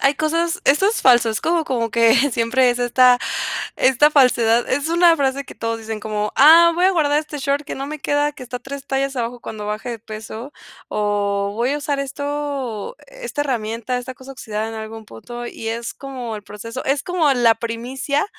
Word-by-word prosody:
Hay 275 +1 +3
cosas 330 +4 0
esto 295 +8 +4
es 440 - -1
falso, 240 -3 +5
es 220 - -2
como 335 -1 +1
como 235 -5 -1
que 230 -1 +4 0.2
siempre 245 +2 +2
es 245 - -2
esta 245 0 +4 0.6
esta 265 +4 +4
falsedad, 240 -4 +3
es 285 +4 0
una 340 0 +5
frase 275 0 0
que - - -12
todos 230 0 -3
dicen, 220 -1 -5
como, 210 -1 -3
"Ah, 330 +4 +8
voy 360 - +2
a 385 - +3
guardar 295 -3 +2
este 300 -1 -8
short 280 +1 -1
que - - -6
no 275 +1 -5
me 305 0 -6
queda, 290 +1 +1
que 265 - -12
está 250 0 -6
3 280 0 -8
tallas 270 0 -1
abajo 240 0 -3
cuando 210 -1 -7
baje 215 +4 -4
de 230 - -5
peso, 220 +4 -8 0.4
o 200 -1 -1
voy 240 +5 0
a 295 - -1
usar 285 -1 -2
esto 280 - -4
esta - - -6
herramienta, 235 -1 -2
esta 250 +1 -7
cosa 260 +1 -13
oxidada 220 -4 -4
en 225 - -7
algún 220 0 -7
punto", 240 - -9
y 225 -1 -6
es 230 +1 -4
como 250 -5 -6
el 205 - -9
proceso, 230 +5 -7
es 275 +1 0
como 340 -5 +1
la 235 -2 +4
primicia, 245 - -2
255 Hz, 200 wpm, -20 LUFS, 230-290 Hz, 0.6 s, Ah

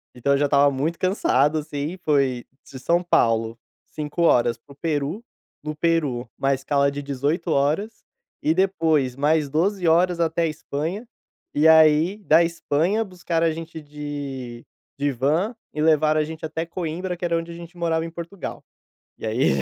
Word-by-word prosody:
então, 140 +3 +1
eu - - +3
já 145 - +2
estava 140 0 +4
muito 150 +5 -2
cansado, 155 - +2
assim, 150 +3 -4
foi 135 -5 +1 0.2
de 130 - -11
São 170 +7 +1
Paulo, 115 -8 +2 0.3
5 150 +2 -5
horas 120 -8 +3
para 140 - -20
o - - -22
Peru, 150 +5 -2 0.4
no 150 0 -5
Peru, 150 -7 0
1 135 0 +2
escala 140 +1 +1
de 140 +1 -5
18 145 +5 -2
horas, 155 +11 0 0.4
e 155 - +2
depois 160 -8 +1
mais 150 +1 +2
12 180 +6 0
horas 175 +2 +3
até 165 +1 +1
a - - +2
Espanha, 155 +7 -4 0.5
e 150 +2 +4
aí 160 +4 +5
da 160 -2 +5
Espanha, 170 +4 0
buscaram 175 -4 -1
a - - +1
gente 160 0 -7
de 145 -5 -7 0.3
de 145 0 0
van, 155 - 0 0.2
e 150 - -3
levaram 155 0 +3
a - - +1
gente 160 +1 -7
até 160 +1 -3
Coimbra, 175 +1 -4
que 180 - -4
era 170 -1 +1
onde 165 0 -3
a - - -8
gente 170 +1 -11
morava 165 -1 0
em 165 - -7
Portugal. 170 +3 -7 0.6
E - - -10
aí, 110 +4 +1
155 Hz, 175 wpm, -23 LUFS, 140-170 Hz, 0.6 s, aí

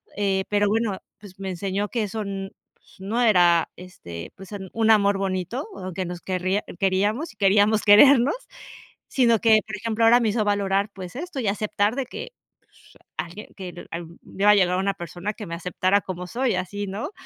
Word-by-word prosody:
eh, 195 -1 0
pero 205 0 +2
bueno, 215 -2 0 0.2
pues 195 -2 -14
me 190 - -3
enseñó 195 +3 -2
que 235 -3 -1
eso, 210 +1 -4
mm, 195 -1 -4 0.3
pues, - - -24
no 215 +6 -2
era 175 -7 +4
este, 85 - -10
pues 190 0 -12 0.2
un 225 -1 +3
amor 200 -2 +4
bonito, 195 - -3
aunque 185 0 -5
nos 175 -1 -6
querría 185 +2 -1 0.2
queríamos, 205 - 0
y - - -38
queríamos 205 +2 +3
querernos, 245 +5 +7 0.8
sino 235 -4 +3
que, 220 -1 +5
por 215 - -5
ejemplo, 225 +2 0
ahora 235 +2 +7
me 230 -3 +1
hizo 215 +1 0
valorar 200 0 +1
pues 185 0 -9
esto, 325 +1 -5
y 225 - -2
aceptar 210 +2 0
de 270 - -2
que, - - -7 0.3
pues - - -24 0.2
alguien 180 +5 -6
que 180 -2 -8
am 170 0 -7
me 195 - -10
iba 210 - +6
a - - +6
llegar 180 -2 +3
una 195 +1 0
persona 175 +5 -5
que 210 - -8
me 170 - -6
aceptara 185 +3 +1
como 180 -2 -6
soy, 245 +6 0
así, 205 +2 -4
¿no? 205 - -5
200 Hz, 190 wpm, -24 LUFS, 185-220 Hz, 0.8 s, querernos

